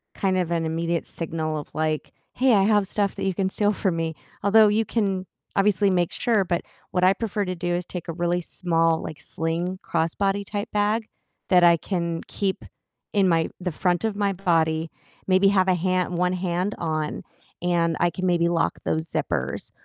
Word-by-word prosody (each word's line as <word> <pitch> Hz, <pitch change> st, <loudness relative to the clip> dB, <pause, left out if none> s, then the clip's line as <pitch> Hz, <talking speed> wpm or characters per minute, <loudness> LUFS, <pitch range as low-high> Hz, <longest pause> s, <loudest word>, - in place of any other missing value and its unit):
kind 190 Hz, -1 st, +1 dB
of 175 Hz, -2 st, 0 dB
an 165 Hz, -1 st, 0 dB
immediate 165 Hz, +1 st, -1 dB
signal 160 Hz, -2 st, -3 dB
of -, -, -8 dB
like, 155 Hz, -1 st, -1 dB, 0.2 s
"Hey, 255 Hz, -2 st, +3 dB
I 195 Hz, -2 st, +5 dB
have 205 Hz, -2 st, +3 dB
stuff 200 Hz, -1 st, 0 dB
that -, -, -5 dB
you 190 Hz, -, +1 dB
can 190 Hz, -1 st, 0 dB
steal 205 Hz, +1 st, +1 dB
from 185 Hz, -4 st, 0 dB
me," 160 Hz, -1 st, -2 dB, 0.3 s
although 215 Hz, +1 st, +6 dB
you 220 Hz, +2 st, +2 dB
can 195 Hz, -4 st, -1 dB, 0.3 s
obviously 200 Hz, 0 st, +3 dB
make 175 Hz, -2 st, +1 dB
sure, 225 Hz, -5 st, +2 dB
but 175 Hz, -1 st, 0 dB, 0.3 s
what 180 Hz, 0 st, 0 dB
I 185 Hz, +1 st, +6 dB
prefer 210 Hz, -2 st, -2 dB
to 185 Hz, 0 st, -3 dB
do 175 Hz, 0 st, -2 dB
is 175 Hz, -1 st, -3 dB
take 180 Hz, -1 st, -7 dB
a -, -, -2 dB
really 175 Hz, +1 st, 0 dB
small, 165 Hz, -2 st, +1 dB
like, 155 Hz, -, -7 dB
sling 170 Hz, +3 st, -3 dB
crossbody 195 Hz, +5 st, 0 dB
type 205 Hz, +1 st, -4 dB
bag 210 Hz, +2 st, +1 dB, 0.4 s
that 180 Hz, -2 st, +5 dB
I 170 Hz, -1 st, +7 dB
can 170 Hz, -2 st, -2 dB
keep 195 Hz, -2 st, -2 dB, 0.5 s
in 195 Hz, -2 st, +4 dB
my 165 Hz, -1 st, +2 dB
the 180 Hz, -1 st, -2 dB
front 175 Hz, +4 st, 0 dB
of 215 Hz, -2 st, -1 dB
my 200 Hz, -1 st, +1 dB
body, 165 Hz, -3 st, +1 dB, 0.4 s
maybe 190 Hz, +1 st, +5 dB
have 190 Hz, -2 st, +3 dB
a 180 Hz, -, +4 dB
hand 180 Hz, 0 st, 0 dB
1 180 Hz, 0 st, +1 dB
hand 180 Hz, +2 st, -1 dB
on, 155 Hz, -2 st, -2 dB, 0.4 s
and 170 Hz, -2 st, +1 dB
I 175 Hz, -, +4 dB
can 185 Hz, +2 st, -4 dB
maybe 170 Hz, -1 st, +2 dB
lock 165 Hz, -1 st, 0 dB
those 160 Hz, +1 st, -1 dB
zippers, -, -, -2 dB
180 Hz, 195 wpm, -24 LUFS, 165-195 Hz, 0.5 s, I